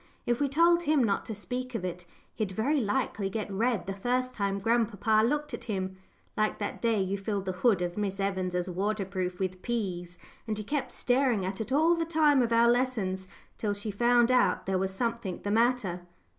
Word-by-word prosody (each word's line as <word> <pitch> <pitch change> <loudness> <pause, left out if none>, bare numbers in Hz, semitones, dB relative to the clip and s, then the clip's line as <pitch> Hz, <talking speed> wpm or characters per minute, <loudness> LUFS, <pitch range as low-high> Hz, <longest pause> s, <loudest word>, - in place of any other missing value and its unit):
If 240 +2 0
we 285 - +2
told 340 +4 +4
him 295 -3 +3
not 200 -3 0
to 220 - -4
speak 250 +5 -5
of 190 -5 -2
it, 180 -1 -5 0.3
he'd 215 -4 -2
very 275 +10 +1
likely 210 -3 -1
get 210 0 -4
red 225 +2 0
the 195 - -3
first 250 +5 -1
time 200 -1 -1
grandpapa 220 0 +2
looked 295 +5 0
at 235 - -6
him 190 -4 -3 0.4
like 215 0 0
that 205 - -4
day 230 -3 +2
you 195 +1 -1
filled 200 -1 -2
the 190 - -1
hood 185 0 +2
of 175 +3 -3
Miss 200 -1 -2
Evans' 185 -2 -1
waterproof 190 -1 -2
with 185 -1 -3
peas, 180 -7 -3 0.3
and 215 -1 -2
he 215 - -4
kept 285 +6 -2
staring 245 -6 +1
at 190 +2 -3
it 220 - -5
all 315 +5 +4
the 335 -1 0
time 310 -4 +3
of 235 -1 0
our 230 +1 +5
lessons, 215 -7 -1 0.3
till 205 -2 -1
she 205 +1 -4
found 240 +3 +3
out 250 -1 +3
there 190 -1 0
was 190 0 0
something 230 -2 -2
the 205 - -1
matter." 225 -5 +1
215 Hz, 200 wpm, -29 LUFS, 190-245 Hz, 0.4 s, our